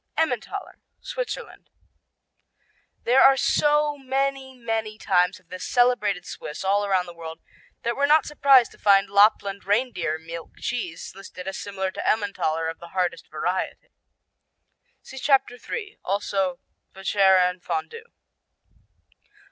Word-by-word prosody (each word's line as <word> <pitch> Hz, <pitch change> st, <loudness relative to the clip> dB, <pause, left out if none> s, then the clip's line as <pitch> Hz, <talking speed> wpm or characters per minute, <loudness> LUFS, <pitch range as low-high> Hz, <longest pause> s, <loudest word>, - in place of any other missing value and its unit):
Emmentaler 320 Hz, -, -2 dB, 0.2 s
Switzerland -, -, -6 dB, 1.3 s
There 255 Hz, +3 st, +4 dB
are 270 Hz, 0 st, +7 dB
so 295 Hz, +2 st, +2 dB
many, 270 Hz, 0 st, -2 dB
many 225 Hz, -2 st, -3 dB
types 180 Hz, -4 st, +2 dB
of 180 Hz, -2 st, -32 dB
this 185 Hz, 0 st, -7 dB
celebrated 230 Hz, -7 st, +2 dB
Swiss 150 Hz, -, -7 dB
all 200 Hz, +2 st, +2 dB
around 190 Hz, -3 st, +1 dB
the 175 Hz, -, -10 dB
world 165 Hz, -1 st, -8 dB, 0.4 s
that 235 Hz, 0 st, -1 dB
we're 280 Hz, +1 st, +2 dB
not 305 Hz, 0 st, +5 dB
surprised 275 Hz, -4 st, +5 dB
to -, -, -18 dB
find 195 Hz, -1 st, +4 dB
Lapland 200 Hz, -1 st, +3 dB
reindeer 200 Hz, -7 st, 0 dB
milk 165 Hz, +1 st, -9 dB
cheese 175 Hz, -9 st, -4 dB
listed 190 Hz, -1 st, -10 dB
as 195 Hz, -, -4 dB
similar 190 Hz, -2 st, -3 dB
to -, -, -2 dB
Emmentaler 165 Hz, -7 st, 0 dB
of 165 Hz, 0 st, -5 dB
the 170 Hz, -, -10 dB
hardest 175 Hz, -2 st, -1 dB
variety. 180 Hz, +4 st, -3 dB, 1.1 s
(See 265 Hz, -, -9 dB
Chapter 265 Hz, -3 st, +2 dB
3, 405 Hz, -, -6 dB
also 195 Hz, -2 st, -1 dB, 0.4 s
Vacherin 190 Hz, -2 st, +3 dB
Fondu.) 175 Hz, -, -4 dB
200 Hz, 125 wpm, -24 LUFS, 180-260 Hz, 1.3 s, are